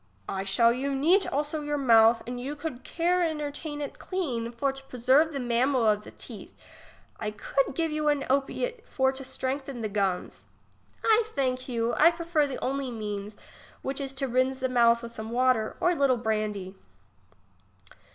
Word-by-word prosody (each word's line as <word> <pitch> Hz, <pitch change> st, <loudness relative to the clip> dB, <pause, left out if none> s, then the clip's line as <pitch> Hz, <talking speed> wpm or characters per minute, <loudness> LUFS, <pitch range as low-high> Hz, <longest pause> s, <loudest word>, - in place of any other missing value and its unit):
I 195 Hz, 0 st, -3 dB
shall 230 Hz, +5 st, +4 dB
you 275 Hz, +3 st, -2 dB
neat 345 Hz, +9 st, +3 dB
also 300 Hz, +2 st, -2 dB
your 295 Hz, 0 st, -2 dB
mouth, 230 Hz, -3 st, +5 dB
and 245 Hz, 0 st, -5 dB
you 280 Hz, +4 st, -4 dB
could 295 Hz, -4 st, -6 dB
care 350 Hz, +1 st, +1 dB
entertain 300 Hz, -1 st, -3 dB
it 285 Hz, -, -6 dB
clean, 255 Hz, -12 st, -3 dB
for 255 Hz, +4 st, 0 dB
to 270 Hz, 0 st, -9 dB
pre 255 Hz, -2 st, -9 dB
serve 275 Hz, +7 st, +4 dB
the 280 Hz, -, -3 dB
mamel 245 Hz, 0 st, +2 dB
of 210 Hz, 0 st, +2 dB
the -, -, -10 dB
teeth; -, -, -10 dB, 0.6 s
I 215 Hz, -, -2 dB
could 260 Hz, +6 st, -1 dB
give 325 Hz, 0 st, 0 dB
you 305 Hz, 0 st, +1 dB
a 290 Hz, -2 st, +1 dB
opiate 435 Hz, -, -1 dB
for 265 Hz, -1 st, +1 dB
to 270 Hz, 0 st, -8 dB
strengthen 265 Hz, 0 st, -4 dB
the 220 Hz, -, -1 dB
gums. 195 Hz, -3 st, -2 dB, 0.6 s
I 445 Hz, 0 st, +5 dB
thank 255 Hz, -1 st, -1 dB
you; 235 Hz, -1 st, 0 dB
I 315 Hz, +6 st, +6 dB
prefer 335 Hz, -3 st, 0 dB
the 270 Hz, -, -5 dB
only 275 Hz, 0 st, -1 dB
means, 210 Hz, -2 st, -5 dB, 0.5 s
which 270 Hz, +1 st, -2 dB
is 270 Hz, -1 st, -4 dB
to 270 Hz, 0 st, -1 dB
rinse 255 Hz, +1 st, +1 dB
the 260 Hz, -, 0 dB
mouth 235 Hz, -1 st, +4 dB
with 230 Hz, -, -6 dB
some 220 Hz, -1 st, -7 dB
water, 245 Hz, -2 st, +1 dB
or 355 Hz, -, +3 dB
a -, -, 0 dB
little 275 Hz, -4 st, +3 dB
brandy. 215 Hz, -4 st, -2 dB
265 Hz, 180 wpm, -27 LUFS, 235-290 Hz, 0.6 s, I